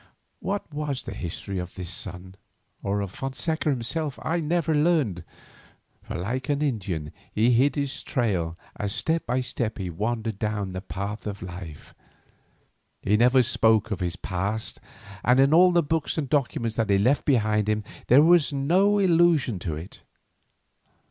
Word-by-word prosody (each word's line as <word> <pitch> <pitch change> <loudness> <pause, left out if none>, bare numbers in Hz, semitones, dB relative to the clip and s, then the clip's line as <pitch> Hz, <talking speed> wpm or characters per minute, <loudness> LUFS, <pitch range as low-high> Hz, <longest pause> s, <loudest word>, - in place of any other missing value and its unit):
What 200 +1 -2
was 145 -3 -3
the - - -6
history 95 +2 -5
of 90 0 -6
this 90 -1 -6
son, 95 -2 -5 0.5
or 100 +1 -1
of 100 -2 -4
Fonseca 150 +7 -2
himself, 145 +3 -1
I 170 +2 0
never 165 0 0
learned, 150 - +2 0.8
for - - -7
like 120 +10 -3
an 145 +1 +1
Indian 95 - -2 0.2
he 115 +3 +3
hid 130 +3 +3
his 140 -1 -2
trail 95 - -1 0.2
as 100 -1 -3
step 160 +1 -1
by 125 +2 +1
step 115 -3 -3
he 95 -4 -4
wandered 110 +3 -2
down 105 -2 -2
the 95 0 -5
path 100 +3 -5
of 100 -2 -5
life. 85 -4 -9 1.1
He 105 - +3
never 125 +3 +5
spoke 110 -1 +2
of 100 - -2
his 90 -1 -2
past, 100 +4 -3 0.4
and 125 +2 +4
in 135 +2 +5
all 180 +2 +7
the 170 -1 +3
books 160 +2 -1
and 150 -3 -1
documents 120 -5 -1
that 110 -3 0
he 100 - +4
left 125 +8 +2
behind 110 -5 +2
him 105 0 0 0.2
there 150 +7 +7
is 165 -5 +4
no 180 +9 +3
allusion 170 - +3
to 85 -3 -3
it. 80 +5 -9
115 Hz, 160 wpm, -25 LUFS, 100-145 Hz, 1.1 s, all